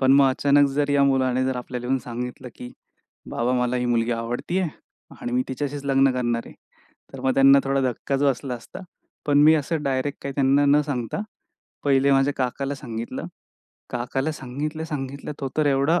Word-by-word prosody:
पण 135 0 +5
मग 140 0 +6
अचानक 140 +2 +3
जर 145 +1 0
या 140 0 +4
मुलाने 130 -2 +2
जर 130 -1 -1
आपल्याला 125 0 -5
येऊन 135 +1 +1
सांगितलं 125 +1 -6
की, 125 - -8 0.6
"बाबा 120 +2 0
मला 125 0 0
ही 125 - -1
मुलगी 120 -1 +1
आवडते 120 +10 -2
आहे 180 -3 0 0.5
आणि 120 - -4
मी 125 +1 +2
तिच्याशीच 140 +2 -4
लग्न 135 -1 +4
करणार 120 -2 -1
आहे." - - -12 0.6
तर - - -8
मग 130 - +1
त्यांना 135 +1 +7
थोडा 135 0 +1
धक्काच 135 +3 -2
बसला 135 -1 0
असता, 120 +9 -11 0.5
पण 145 -1 +3
मी 155 +1 +7
असं 155 +1 -2
डायरेक्ट 135 +1 -1
काही 140 - -4
त्यांना 140 +1 +3
न 145 +1 +5
सांगता 135 - -3 0.6
पहिले 140 0 +4
माझ्या 135 +1 +3
काकाला 135 +2 -2
सांगितलं. 115 -3 -6 0.7
काकाला 135 +5 -2
सांगितलं, 150 +4 -5
सांगितलं, 140 -2 -5
तो 135 - -2
तर 155 - +2
एवढा 145 +5 +3
135 Hz, 180 wpm, -24 LUFS, 125-145 Hz, 0.7 s, त्यांना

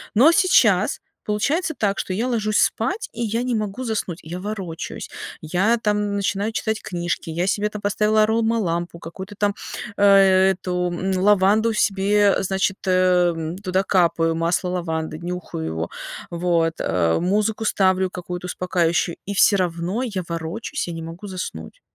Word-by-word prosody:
Но 265 +9 +7
сейчас 235 - +3 0.2
получается 295 - 0
так, 200 -2 0
что 185 - -3
я 225 +6 -1
ложусь 215 -4 0
спать, 360 - 0
и 235 - -6
я 230 +1 -1
не 250 -1 -1
могу 215 +3 -3
заснуть. 210 -7 -3
Я 170 +3 -6
ворочаюсь, 190 -5 -5 0.3
я, 190 +9 +1
там, 210 -2 0
начинаю 200 +2 -1
читать 220 -1 -2
книжки, 175 -2 -3
я 170 +3 -1
себе 205 +1 +1
там 210 - -7
поставила 210 +1 +2
аромалампу, 215 -7 0
какую-то 190 +5 -9
там, 205 0 +1 0.4
а, - - -2 0.2
э 190 -1 +5
эту, 180 -1 -2 0.3
лаванду 210 +3 +4
себе, 205 0 +3
а, - - -1
значит, 190 0 0
эм, 180 -3 +2
туда 190 -1 0
капаю, 170 -4 +2
масло 170 +3 0
лаванды, 160 -2 -3
нюхаю 175 - -5
его, 80 +1 -3 0.4
вот, 170 -1 +1
а, 85 -1 +1
музыку 210 +5 0
ставлю 190 -2 +2
какую-то 180 0 -6
успокаивающую, 175 -1 0
и 205 - -2
всё 200 +1 +5
равно 180 +4 -1
я 205 -7 -3
ворочусь, 170 - -4
я 170 - -4
не 165 0 -6
могу 165 +5 -8
заснуть. 190 - -7
190 Hz, 155 wpm, -22 LUFS, 175-215 Hz, 0.4 s, Но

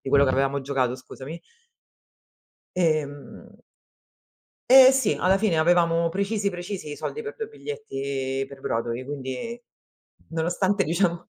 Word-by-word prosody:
di - - -7
quello 140 +1 +5
che 130 - +2
avevamo 135 +1 +1
giocato 130 -3 0
scusami. 135 +5 -9 1.4
Ehm 155 -5 -2 1.1
Ehm, 260 0 +10
sì, 265 0 +2
alla 190 +2 +3
fine 195 -6 +1
avevamo 170 0 +3
precisi 200 +2 -1
precisi 180 -3 -6
i - - -6
soldi 455 - -4
per 440 0 -7
2 445 - -4
biglietti 140 - -4
per 140 -1 -11
Broadway, 115 +1 -2
quindi 145 - -5 0.7
nonostante 180 +5 +1
diciamo 170 0 0
165 Hz, 125 wpm, -25 LUFS, 135-200 Hz, 1.4 s, Ehm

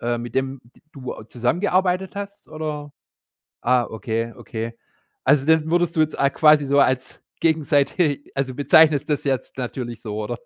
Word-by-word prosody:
äh, 120 0 -1
mit 120 0 -7
dem 135 0 -1
d 120 - -25
du 130 -3 -6
auch 110 - -12
zusammengearbeitet 180 - 0
hast 200 0 -7
oder? 150 -2 -5 0.7
Ah, 125 0 +3
okay, 115 +2 -3
okay. 115 +1 -6 0.5
Also, 135 0 +4
den 160 0 +3
würdest 175 -1 +1
du - - +3
jetzt 155 -1 0
a 140 - +3
quasi 150 -1 +5
so 140 +1 +2
als 130 -2 0 0.2
gegenseitig 150 -1 +1
also, 135 -1 -2
bezeichnest 150 +1 +4
das 145 - 0
jetzt 135 -2 -2
natürlich 120 -2 -5
so, 105 -1 -4
oder? 120 +2 -4
140 Hz, 165 wpm, -22 LUFS, 120-155 Hz, 0.7 s, quasi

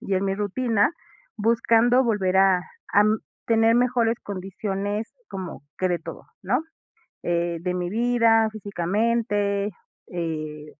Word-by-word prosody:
y 195 - -2
en 190 +1 +1
mi 195 - 0
rutina, 210 - +1 0.5
buscando 230 +3 +3
volver, 195 -5 +1
ah, 190 -1 +5 0.3
am, 215 +1 +4 0.3
tener 225 0 +4
mejores 240 -2 +2
condiciones, 200 +2 -4 0.2
como 185 -6 -7 0.2
que 185 - +1
de 175 -1 0
todo, 165 - -9 0.2
¿no?, - - +1 0.6
eh, 170 0 0
de 180 +1 -1
mi 180 -1 -2
vida, 230 0 +3
físicamente, 205 +1 0 0.4
eh, 155 -3 -4
205 Hz, 120 wpm, -24 LUFS, 185-225 Hz, 0.6 s, ah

